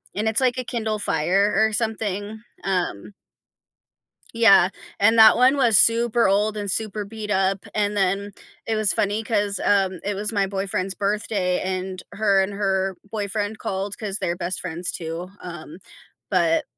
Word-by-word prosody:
and 210 +3 -1
it's 220 +3 +2
like 255 -1 +1
a - - -2
Kindle 220 -3 -3
Fire 195 +3 +1
or 220 +1 +3
something, 215 -1 -3 0.2
um 185 - -2 1.2
Yeah, 210 -6 +6 0.3
and 225 +3 +4
that 220 0 +8
one 255 +3 +4
was 235 -6 +4
super 230 -1 +4
old 210 +2 +1
and 205 -1 -2
super 215 +1 -1
beat 210 0 -8
up, 195 0 0
and 205 0 0
then 200 +1 0 0.3
it 225 - -1
was 215 -2 +3
funny 205 +2 0
'cause, 205 -3 0
um, 190 -2 +2
it 205 +1 -2
was 210 +3 -2
my 200 -2 +1
boyfriend's 195 -1 -3
birthday, 200 -2 -1
and 185 0 -4
her 200 -2 +2
and 190 +1 -3
her 195 -2 -1
boyfriend 210 0 -3
called 195 +1 -4
'cause 205 -2 -3
they're 175 -3 -2
best 180 0 -3
friends, 175 0 -4
too, 165 +2 -6
um, 170 -2 -9 0.5
but 170 -4 +2
200 Hz, 160 wpm, -22 LUFS, 190-215 Hz, 1.2 s, that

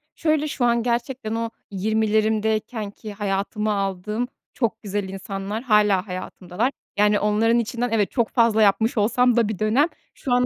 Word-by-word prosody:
Şöyle, 310 -1 +1
şu 255 -4 -1
an 235 -1 +2
gerçekten 240 -1 -2
o 230 0 -2 0.2
20’lerimdeykenki 215 +1 0
hayatıma 205 +1 -1
aldığım 200 +4 -2 0.3
çok 230 -3 -1
güzel 200 -1 -3
insanlar 195 +3 -5
hâlâ 210 -4 +3
hayatımdalar, 185 +5 -3 0.3
yani, 210 0 +4
onların 220 +3 +2
içinden, 240 +1 -2
evet, 215 -3 +1
çok 235 -3 +1
fazla 230 -3 +3
yapmış 220 +3 +3
olsam 245 +3 +3
da 230 -3 +4
bir 210 - -4
dönem, 230 +9 +3 0.3
şu 250 - -3
an 250 0 +4
220 Hz, 150 wpm, -23 LUFS, 205-235 Hz, 0.3 s, yani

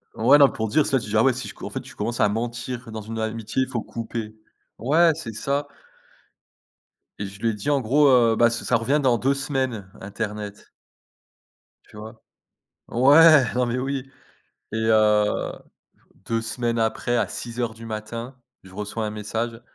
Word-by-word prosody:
Ouais, 130 +6 +5
non, 140 -2 +7
pour 110 - -3
dire 145 +8 +2
soit 135 - +1
tu 115 - -8
dis: 105 - -2
«Ah 110 - +5
ouais 135 - +5
si 125 0 -5
je - - -8
co - - -10
en - - -5
fait, - - -4
tu - - -13
commences 115 +3 -3
à 105 - +5
mentir 120 +2 -4
dans 110 - -5
une 110 +2 -7
amitié, 110 +3 -2
il 130 - -6
faut 120 -3 -2
couper» 115 -1 -6 0.4
ouais, 160 +8 +4
c'est 145 -8 -6
ça 140 +6 -2 1.5
et 100 - -3
je 100 +1 -10
lui 115 - +2
ai - - -1
dit 105 +6 -4
en 140 -2 +2
gros, 140 +6 +3
heu: 120 -3 +5
«Bah 120 0 +5
ça 120 +1 -4
ça 125 - +2
revient 135 +6 +1
dans 125 -3 +3
2 135 +4 +1
semaines, 130 -7 -3
internet 105 +1 -6 1.2
tu - - -14
vois? 110 +2 -10 0.7
Ouais, 145 +4 +7
non 125 0 +2
mais 120 +1 -2
oui 135 0 -3 0.6
et 110 - -3
heu, 105 -1 +2 0.7
2 115 0 0
semaines 115 +1 -2
après 115 +2 0
à - - +1
06:00 120 -1 -4
du 115 0 -12
matin, 115 +3 -6 0.3
je 95 - -15
reçois 105 +2 -4
un - - -3
message, 110 +2 -4
115 Hz, 190 wpm, -23 LUFS, 110-130 Hz, 1.5 s, non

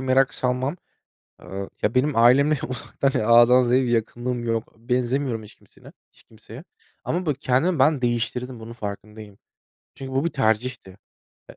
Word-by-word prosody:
merak 130 0 +2
salmam, 130 +5 -1 0.7
eee, 95 0 -7
ya, 105 +4 0
benim 140 +2 +2
ailemle 140 +6 +5
uzaktan 130 +2 -2
A’dan 120 +3 +6
Z’ye 125 +2 +2
bir 125 - -2
yakınlığım 120 +1 -2
yok. 115 -1 -3
Benzemiyorum 125 0 -1
hiç 105 - -14
kimseyle - - -18 0.2
hiç - - -21
kimseye. 110 +5 -13 0.4
Ama 180 +2 -2
bak 150 -4 -1
kendimi 145 +6 +1
ben 145 -1 +3
değiştirdim, 120 +1 -2
bunun 115 +1 -9
farkındayım. 105 -1 -8 0.6
Çünkü 135 0 -8
bu 135 +4 0
bir 170 - 0
tercihti. 115 -4 -1 0.6
Eee, - - -13
125 Hz, 150 wpm, -23 LUFS, 115-135 Hz, 0.7 s, A’dan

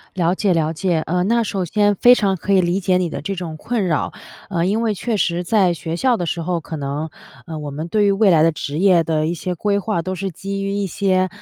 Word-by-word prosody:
了 175 0 +1
解 195 -1 +1
了 160 -1 +1
解， 170 0 0
呃， 180 +2 0
那 235 +3 +2
首 195 -4 -2
先 205 +4 +2
非 245 +6 +6
常 200 -5 +1
可 200 +3 -2
以 190 - +5
理 180 +2 0
解 180 -1 +2
你 180 -2 0
的 - - -5
这 195 - -3
种 170 -3 -6
困 225 +3 -2
扰。 160 -4 -1 0.4
呃， 170 -3 0
因 210 +4 +1
为 225 -2 0
确 225 +3 -2
实 175 -2 0
在 185 -2 +2
学 165 +2 -4
校 255 +3 +2
的 175 - -3
时 170 +1 -2
候， 175 0 -1
可 160 +1 -7
能， 145 +2 -4 0.4
嗯， 160 -2 -6
我 145 - -5
们 155 +4 -5
对 210 +3 +2
于 200 - +4
未 200 -1 +4
来 160 -3 +5
的 165 - +5
职 150 0 -5
业 180 -3 +4
的 155 -1 0
一 170 - -1
些 180 +2 -4
规 200 +3 0
划 200 -4 -1
都 185 +2 -3
是 190 +1 -3
基 195 +3 -5
于 195 - -2
一 200 0 -1
些 185 0 +1
180 Hz, 285 characters per minute, -20 LUFS, 165-200 Hz, 0.4 s, 非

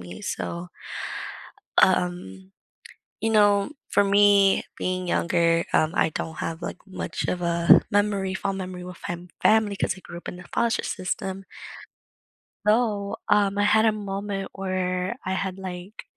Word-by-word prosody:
me?" 90 0 -9
So 170 +1 -4 1.1
u - - +6
um, 175 - -2 0.7
you 225 - +1
know, 205 +2 +4 0.2
for 205 - +4
me 200 -1 +5
being 185 0 -2
younger, 170 -1 +2
um, 155 +1 +3
I - - +3
don't 160 +1 -5
have, 165 +1 -4
like, 175 - -5
much 170 -4 -4
of 180 - -1
a 170 0 +5
memory 200 -2 +1
fond 195 0 -2
memory 185 -1 -6
with 180 -1 -8
my 175 - -2
fam 175 +1 -12 0.2
family 215 -2 +4
‘cause 190 - -1
I - - -10
grew 170 - -9
up - - -10
in 180 - -8
the 180 - -11
foster 235 -1 +1
system 190 0 -3 1.2
so, 210 -3 +2
um, 205 -1 +3
I 205 - +3
had 220 +2 +4
a 220 - +5
moment 200 -1 -4
where 185 +1 -2
I 185 - -1
had, 190 0 -2
like 185 +1 -7
190 Hz, 160 wpm, -25 LUFS, 175-205 Hz, 1.2 s, u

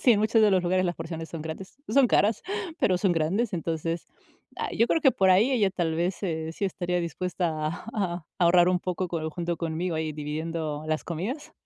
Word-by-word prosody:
Sí, 245 - +6
en 210 - +2
muchos 220 +1 +3
de 210 - +6
los 185 -2 +3
lugares 185 +1 +2
las 175 -1 0
porciones 165 0 -6
son 165 -2 -5
grandes, 160 +7 -7
no - - -3
son 275 -2 +6
caras, 210 -1 +2 0.4
pero 185 -3 +3
son 195 -2 +2
grandes. 180 +8 0
Entonces, 165 -1 -2 0.5
ay, - - -3
yo 230 - +5
creo 325 - +2
que 270 -3 +6
por 190 -5 +3
ahí 205 +8 +5
ella 215 -7 +3
tal 170 -4 -1
vez, 175 +3 0
se 160 -4 -3
sí 200 - -3
estaría 180 -2 -1
dispuesta 170 -1 -2
a 180 -5 -2
ahorrar 175 0 +5
un 180 0 +2
poco 180 0 -2 0.2
junto 170 +1 -3
conmigo, 165 +1 -2
ahí 155 -1 -2
dividiendo 155 0 -4
las 155 0 -1
comidas, 200 - -4
175 Hz, 205 wpm, -27 LUFS, 160-190 Hz, 0.5 s, Sí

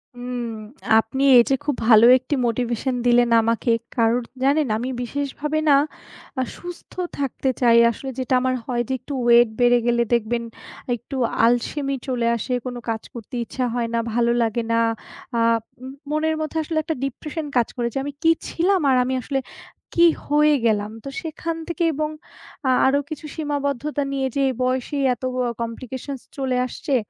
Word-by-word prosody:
উম 245 0 -4 0.5
আপনি 250 +5 -2
এই 240 - +8
যে 270 - +4
খুব 290 -2 0
ভালো 225 -1 +8
১ 255 - -12
টি 290 - +2
motivation 240 +2 -1
দিলেন 240 0 +4
আমাকে। 230 +1 +1 0.2
কারণ 230 +1 +2 0.2
জানেন 285 +2 +3
আমি 245 +3 -3
বিশেষভাবে 285 +4 -2
না 285 - +7 0.6
আ - - +2 0.2
সুস্থ 355 -1 -10 0.3
থাকতে 270 -1 -1
চাই। 235 -2 +6
আসলে 265 +4 -7
যেটা 260 +1 -1
আমার 255 0 +1
হয় 240 -1 -1
যে - - 0
একটু 270 +4 -8
ওয়েট 240 0 +6
বেড়ে 245 0 +5
গেলে 235 0 +3
দেখবেন 235 0 0 0.5
একটু 240 +4 -9 0.3
আলসেমি 275 +4 0
চলে 245 -3 0
আসে 245 +3 -3
কোনো 245 -1 -4
কাজ 220 -1 -2
করতে 235 +1 -8
ইচ্ছা 255 +2 -4
হয় 240 -1 -1
না 230 - +2
ভালো 235 0 +2
লাগে 230 0 0
না, 230 - +3 0.6
আ - - +2 0.5
মু 260 - -7 0.2
মনের 315 +1 +1
মধ্যে 310 +1 -3
আসলে 315 +1 -3
১ 310 - -19
টা - - 0
ডিপ্রেশন 300 +4 -5
কাজ 235 - +3
করে 240 -1 0
যে - - -3
আমি 285 +1 -5
কী 330 - +6 0.2
ছিলাম? 370 +3 +1
আর 260 - +4
আমি 255 +1 -2
আসলে 270 +2 -2 0.5
কী 340 - +5 0.2
হয়ে 300 +1 +4
গেলাম? 210 -2 +1
তো - - -8
সেখান 330 0 -4
থেকে 340 0 -2
এবং 305 +1 -1 0.6
আ - - +3 0.2
আরো 275 +2 +3
কিছু 310 -1 -7
সীমাবদ্ধতা 290 -1 -2
নিয়ে 270 -1 0
যে 280 - +2 0.2
বয়সেই 260 +3 0
এত 245 - -12 0.3
অ - - -2
Complications 255 +3 -5 0.2
চলে 260 -2 0
আসছে। 270 +3 -2
255 Hz, 175 wpm, -22 LUFS, 235-285 Hz, 0.6 s, এই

